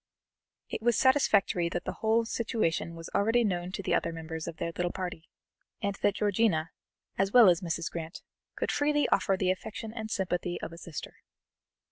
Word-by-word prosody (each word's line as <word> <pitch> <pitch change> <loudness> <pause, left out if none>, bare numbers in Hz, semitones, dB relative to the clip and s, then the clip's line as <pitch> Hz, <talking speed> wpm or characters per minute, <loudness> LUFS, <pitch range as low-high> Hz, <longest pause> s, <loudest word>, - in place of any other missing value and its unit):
It - - -4
was 235 0 +3
satisfactory 205 -10 +3
that 175 - -3
the - - -5
whole 225 +1 +3
situation 215 -8 -1
was 165 0 -9
already 225 +4 +3
known 180 -4 -1
to 200 - -4
the - - 0
other 170 - +1
members 160 0 -6
of 165 - -6
their 170 - -2
little 175 0 -1
party, 180 -3 -6 0.5
and 200 0 -1
that 205 - +2
Georgiana, 200 -6 +1 0.5
as 195 0 +2
well 240 -3 +8
as 170 -2 +3
Mrs. 170 -1 -2
Grant, 165 +1 -6 0.3
could - - -1
freely 295 0 +2
offer 195 - +2
the 185 -1 +2
affection 220 +3 -6
and 220 -2 -5
sympathy 180 -3 -1
of 165 - -6
a - - -10
sister. 170 -4 -8
190 Hz, 180 wpm, -29 LUFS, 170-220 Hz, 0.5 s, well